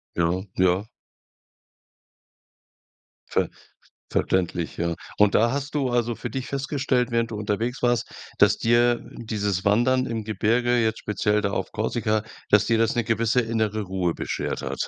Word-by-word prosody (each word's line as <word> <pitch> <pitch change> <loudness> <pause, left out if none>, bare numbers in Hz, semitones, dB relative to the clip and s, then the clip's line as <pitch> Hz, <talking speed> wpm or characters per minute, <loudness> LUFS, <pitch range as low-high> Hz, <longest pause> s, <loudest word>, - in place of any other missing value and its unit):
Ja, 85 +2 +1
ja. 95 +1 +3 2.5
Ver - - +1 0.6
verständlich, 90 -2 0
ja. 85 0 0 0.2
Und 105 -1 +4
da 115 +2 +4
hast 140 +1 -3
du 140 -3 0
also 120 -1 +1
für 120 - -6
dich 130 +2 -4
festgestellt, 135 -2 0
während 115 -1 0
du - - -4
unterwegs 110 +4 -2
warst, 120 -1 +1 0.3
dass - - +4
dir 120 +1 +3 0.2
dieses 105 -4 -2
Wandern 130 +5 +3
im 115 -3 -3
Gebirge, 115 +4 +1
jetzt 110 -2 +1
speziell 105 0 0
da 100 - 0
auf - - -3
Korsika, 110 -1 0 0.3
dass 105 +1 +5
dir 115 - +3
das 115 +4 +2
'ne 120 - +1
gewisse 115 +2 +2
innere 110 -2 -1
Ruhe 90 -3 -1
beschert - - -3
hat? - - -3
115 Hz, 150 wpm, -24 LUFS, 105-120 Hz, 2.5 s, dass